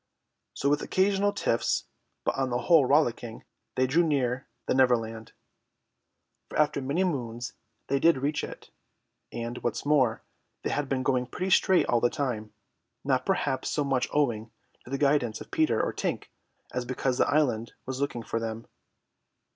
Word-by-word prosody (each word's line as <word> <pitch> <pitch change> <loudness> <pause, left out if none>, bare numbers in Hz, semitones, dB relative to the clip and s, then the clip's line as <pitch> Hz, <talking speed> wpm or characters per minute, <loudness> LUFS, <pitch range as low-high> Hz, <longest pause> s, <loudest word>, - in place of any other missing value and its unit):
So 140 - -1
with 145 +1 +2
occasional 200 +1 +2
tiffs, 115 -11 0 0.4
but - - +1
on 135 -1 -1
the 120 - 0
whole 135 +3 +4
rollicking, 120 -5 +1 0.3
they 130 - +3
drew 140 +7 +3
near 130 -4 0 0.2
the - - +1
Neverland; 115 -4 +1 1.2
for - - -5
after 150 -2 +2
many 140 +8 0
moons 120 -8 -3 0.3
they 140 0 0
did 165 0 +5
reach 145 +3 -1
it, - - -8 0.6
and, 120 +1 -4
what 120 - -1
is - - -5
more, 130 -6 +2 0.4
they - - -1
had 145 -2 -1
been 130 -1 0
going 125 -2 +1
pretty 185 +9 -3
straight 185 0 +5
all 120 -1 +2
the 120 - +4
time, 115 -7 -3 0.5
not 135 -2 0
perhaps 140 -9 0
so 150 - 0
much 135 -2 +1
owing 120 -7 0 0.4
to - - -12
the 135 - -1
guidance 140 -6 +2
of - - -11
Peter 135 -8 +2
or - - 0
Tink - - -3 0.4
as 125 - -1
because 130 +1 -1
the - - +3
island 125 -7 +1
was 130 +1 -4
looking 125 -5 -2
for 115 - -2
them. 115 0 -4
130 Hz, 170 wpm, -28 LUFS, 120-145 Hz, 1.2 s, did